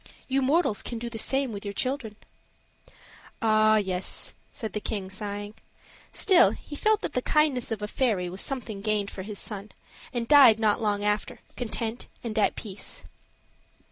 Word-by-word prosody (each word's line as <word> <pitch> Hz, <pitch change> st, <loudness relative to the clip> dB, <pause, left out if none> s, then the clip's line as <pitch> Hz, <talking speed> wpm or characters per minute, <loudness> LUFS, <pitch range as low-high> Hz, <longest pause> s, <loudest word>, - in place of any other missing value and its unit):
You 270 Hz, +1 st, +1 dB
mortals 275 Hz, -4 st, +2 dB
can 235 Hz, -, -5 dB
do 235 Hz, +1 st, -5 dB
the 225 Hz, -, -4 dB
same 270 Hz, +2 st, +2 dB
with 200 Hz, -2 st, -6 dB
your 200 Hz, -1 st, -5 dB
children." 255 Hz, -4 st, -2 dB, 1.2 s
"Ah, 215 Hz, -1 st, +4 dB
yes!" 190 Hz, -3 st, -2 dB, 0.2 s
said 220 Hz, -, -5 dB
the 210 Hz, -, -1 dB
king, 200 Hz, -3 st, -4 dB
sighing. 205 Hz, +1 st, -5 dB, 0.6 s
Still, 370 Hz, -3 st, +5 dB
he 295 Hz, -, -8 dB
felt 430 Hz, +7 st, +2 dB
that -, -, -3 dB
the 250 Hz, -, 0 dB
kindness 280 Hz, -5 st, +2 dB
of 215 Hz, -2 st, -3 dB
a -, -, -1 dB
fairy 210 Hz, -7 st, 0 dB
was 185 Hz, +2 st, -3 dB
something 235 Hz, -7 st, -2 dB
gained 210 Hz, -1 st, 0 dB
for 190 Hz, -, -6 dB
his 205 Hz, +2 st, -6 dB
son, 205 Hz, 0 st, -2 dB, 0.4 s
and 240 Hz, -2 st, -3 dB
died 260 Hz, -6 st, +8 dB
not 215 Hz, 0 st, +2 dB
long 205 Hz, -2 st, 0 dB
after, 210 Hz, 0 st, -1 dB
content 230 Hz, -1 st, -3 dB, 0.2 s
and 220 Hz, -2 st, -2 dB
at 210 Hz, -, +3 dB
peace. 205 Hz, -3 st, -6 dB
220 Hz, 170 wpm, -27 LUFS, 205-250 Hz, 1.2 s, died